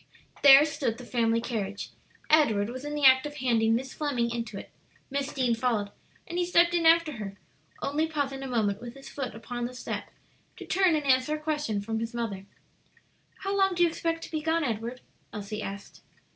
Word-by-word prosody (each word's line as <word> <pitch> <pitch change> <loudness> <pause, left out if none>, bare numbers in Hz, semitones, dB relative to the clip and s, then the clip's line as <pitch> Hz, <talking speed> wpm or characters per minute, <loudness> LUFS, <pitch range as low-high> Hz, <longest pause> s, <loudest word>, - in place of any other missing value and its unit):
There 280 +1 +9
stood 295 -7 -2
the 250 - -10
family 230 -2 +1
carriage. 210 -4 -4 0.4
Edward 230 -9 +3
was 255 +2 -7
in 295 0 -4
the 295 -2 +1
act 260 +1 +7
of 295 - -9
handing 230 -4 +2
Miss 265 +3 -3
Fleming 250 -6 -1
into 230 -3 -4
it; - - -9 0.4
Miss 280 +1 -2
Deane 255 -3 +1
followed, 225 -4 0 0.3
and 345 +1 -4
he - - +2
stepped 345 0 +4
in 335 -2 +3
after 330 -1 +5
her, 200 -2 -7 0.5
only 300 +3 0
pausing 285 -3 -2
a 270 - -5
moment 215 -4 0
with 240 +1 -8
his 275 - -11
foot 260 -6 -5
upon 240 +1 -5
the 250 +1 -6
step - - -5 0.5
to - - -8
turn 370 -3 +3
and 300 -2 -2
answer 260 +2 +3
a - - -6
question 295 -9 -2
from 220 +2 -3
his 230 +1 -4
mother. 200 -5 -4 1.0
"How 395 +1 -1
long 385 -2 +3
do 350 - +3
you 340 - +4
expect 330 0 -2
to - - -9
be 310 -1 -2
gone, 325 +1 +1
Edward?" 235 0 -3 0.3
Elsie 210 +1 -5
asked. 200 0 -8
255 Hz, 200 wpm, -28 LUFS, 225-305 Hz, 1.0 s, There